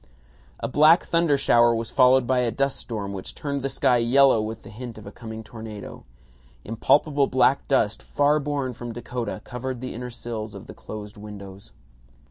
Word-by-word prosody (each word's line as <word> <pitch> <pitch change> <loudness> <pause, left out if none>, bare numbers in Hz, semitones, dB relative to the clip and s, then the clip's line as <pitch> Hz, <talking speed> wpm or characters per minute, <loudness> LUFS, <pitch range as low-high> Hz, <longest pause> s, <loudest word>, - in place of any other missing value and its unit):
A - - -2
black 155 +5 +5
thunder 165 -4 +2
shower 120 -3 +4
was 115 0 -4
followed 130 0 +5
by 130 +1 +2
a 125 -1 +1
dust 140 +3 0
storm 100 -4 -5
which 95 -1 -7
turned 140 -1 -3
the 135 - -2
sky 125 -2 +2
yellow 125 0 +4
with 110 +1 -5
the - - -11
hint 115 +1 -8
of 110 - -11
a 100 - -8
coming 110 -1 -8
tornado. 110 -2 -9 0.6
Impalpable 140 +5 +2
black 130 +1 +2
dust 110 -6 +1
far 145 +1 +2
borne 140 -3 -2
from 120 0 -7
Dakota 120 -2 -5
covered 125 0 -5
the 130 +1 -5
inner 125 +2 -6
sills 115 -2 -6
of - - -9
the - - -10
closed 105 -1 -9
windows. 100 - -10
120 Hz, 180 wpm, -24 LUFS, 110-135 Hz, 0.6 s, black